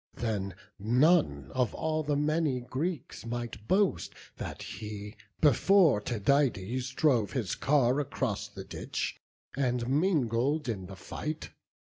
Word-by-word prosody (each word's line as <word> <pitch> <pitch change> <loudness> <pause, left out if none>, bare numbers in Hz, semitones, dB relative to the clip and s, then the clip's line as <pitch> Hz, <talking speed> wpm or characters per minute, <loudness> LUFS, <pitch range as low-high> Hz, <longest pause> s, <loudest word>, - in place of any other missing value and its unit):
Then 100 -5 -2 0.2
none 120 - +3
of 125 -4 0
all 155 0 0
the 145 -1 0
many 150 -2 +1
Greeks 135 +6 -4
might 115 -3 -5
boast 190 - +1 0.2
That - - -6
he, 105 0 -7 0.3
before 155 - +5
Tydides, 125 0 +1
drove 125 -9 +2
his 115 -9 -1
car 135 -2 +3
Across 120 -7 -2
the 100 -2 -9
ditch, - - -4 0.3
and 125 -3 0
mingled 145 - +1
in 95 -6 -3
the 95 - -9
fight. 155 +10 -5
125 Hz, 120 wpm, -30 LUFS, 105-150 Hz, 0.3 s, before